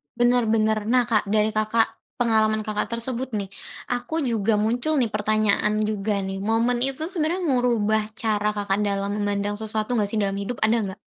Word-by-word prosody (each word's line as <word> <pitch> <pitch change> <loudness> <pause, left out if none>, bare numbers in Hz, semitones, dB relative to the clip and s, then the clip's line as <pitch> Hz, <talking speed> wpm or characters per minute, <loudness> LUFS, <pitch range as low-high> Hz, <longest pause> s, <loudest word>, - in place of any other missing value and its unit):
Benar-benar. 225 -3 +2
Nah, 250 +1 +4
Kak, 215 -3 +2
dari 215 +1 +2
Kakak 215 +1 0 0.2
pengalaman 220 -2 +2
Kakak 210 -1 -1
tersebut 255 +2 -4
nih, 200 -2 -3 0.4
aku 245 +7 -2
juga 225 -3 +1
muncul 240 +8 +1
nih, 245 -4 +2
pertanyaan 215 0 +1
juga, 210 -1 -1
nih. 195 0 -4
Momen 230 +3 +1
itu 270 +4 -1
sebenarnya 350 0 -1
ngerubah 235 -6 +2
cara 210 -2 0
Kakak 205 -1 0
dalam 200 0 -1
memandang 205 0 -1
sesuatu, 220 +2 -2
nggak 205 -2 +1
sih, 220 - -2
dalam 195 -1 -1
hidup? 220 +4 -4
Ada 220 +2 +4
enggak? 190 -1 -5
215 Hz, 165 wpm, -24 LUFS, 205-240 Hz, 0.4 s, Nah